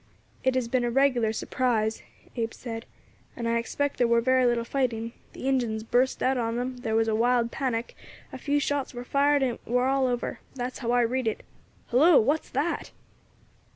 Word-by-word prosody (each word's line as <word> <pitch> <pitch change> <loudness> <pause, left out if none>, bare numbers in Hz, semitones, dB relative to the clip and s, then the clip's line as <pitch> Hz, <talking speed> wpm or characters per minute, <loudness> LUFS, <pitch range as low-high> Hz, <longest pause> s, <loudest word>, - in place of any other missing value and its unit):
"It 260 0 +2
has 255 -2 0
been 250 +1 +1
a 240 - +1
regular 245 -3 +2
surprise," 225 -1 0 0.3
Abe 230 -2 -2
said, 225 -2 -7 0.5
"and 235 -2 -3
I 230 0 +2
expect 285 +5 -2
there 245 - +4
war 235 0 +4
very 255 +1 +3
little 240 -1 +1
fighting. 235 -3 -2 0.2
The 260 - -5
Injins 235 -5 0
burst 250 +3 +1
out 260 0 +2
on 230 -1 -1
them, 250 +1 -3
there 225 -3 -2
war 225 - +4
a 220 - +1
wild 235 +1 +2
panic, 245 -4 -2 0.4
a - - -6
few 290 0 +1
shots 285 -2 -2
war 245 - -5
fired, 280 +2 +2
and 245 -3 -1
it - - -35
war 250 +2 +2
all 270 -1 +2
over; 245 -1 -2 0.2
that's 250 0 -4
how 235 - -3
I 245 0 +4
read 245 +1 0
it. 220 - -2 0.5
Hillo! 295 +7 +6
what's 290 +8 0
that?" 295 +6 -2
245 Hz, 195 wpm, -27 LUFS, 230-260 Hz, 0.5 s, Hillo